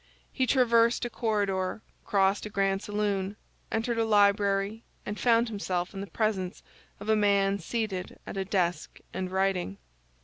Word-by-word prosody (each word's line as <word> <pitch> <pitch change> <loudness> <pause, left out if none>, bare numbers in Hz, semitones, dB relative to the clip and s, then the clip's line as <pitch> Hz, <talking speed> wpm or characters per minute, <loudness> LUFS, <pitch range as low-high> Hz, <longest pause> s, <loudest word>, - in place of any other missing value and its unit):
He 260 - 0
traversed 235 -2 +4
a 240 - -4
corridor, 205 -3 -1 0.2
crossed 195 +1 +2
a - - -8
grand 195 -1 +1
saloon, 205 -2 -1 0.4
entered 230 +1 0
a - - +3
library, 205 0 +2 0.2
and 210 - -4
found 235 -1 +4
himself 190 -4 -2
in 195 - -5
the 200 - -5
presence 190 -1 -2 0.4
of 205 - -8
a 220 - +4
man 200 -1 +3
seated 195 -1 -3
at - - -7
a 195 - -1
desk 180 -4 -1
and 185 0 -3
writing. 190 - 0
200 Hz, 150 wpm, -28 LUFS, 190-220 Hz, 0.4 s, traversed